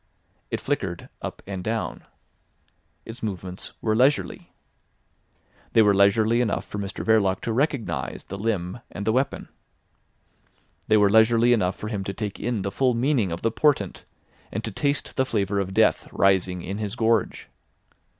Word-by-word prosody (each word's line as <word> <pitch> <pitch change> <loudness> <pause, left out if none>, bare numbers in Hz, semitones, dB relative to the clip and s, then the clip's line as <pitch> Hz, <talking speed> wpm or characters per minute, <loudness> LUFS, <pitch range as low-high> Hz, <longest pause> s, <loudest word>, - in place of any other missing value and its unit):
It - - -2
flickered - - -3
up - - -6
and 95 -2 -5
down. 110 +2 -3 1.0
Its 115 +1 -9
movements 95 -3 -5
were 110 -1 +1
leisurely. 130 +5 +1 1.2
They 110 - +6
were 105 -1 +5
leisurely 110 +4 +4
enough 115 -4 -1
for 105 - -6
Mr 100 -1 -5
Verloc 100 -4 +3
to 115 - -2
recognise 135 -2 -1
the 100 - -7
limb 100 -1 -2
and 100 - -6
the 110 - +3
weapon. 130 +3 -1 1.4
They 110 - +5
were 105 -1 +5
leisurely 115 +3 +5
enough 95 -5 +1
for 105 - -6
him 100 -3 -3
to 100 - -4
take 105 -1 -4
in 115 -3 -2
the 100 - -2
full 125 +3 +1
meaning 120 - +1
of 85 - -5
the 115 - +2
portent, 125 -6 +1 0.5
and - - -3
to - - -4
taste 140 -1 -1
the 130 - +4
flavour 100 -5 -1
of 95 -1 -2
death - - +2
rising 95 -2 +2
in 100 +3 -4
his 105 0 -3
gorge. 115 -2 0
110 Hz, 160 wpm, -25 LUFS, 100-115 Hz, 1.4 s, They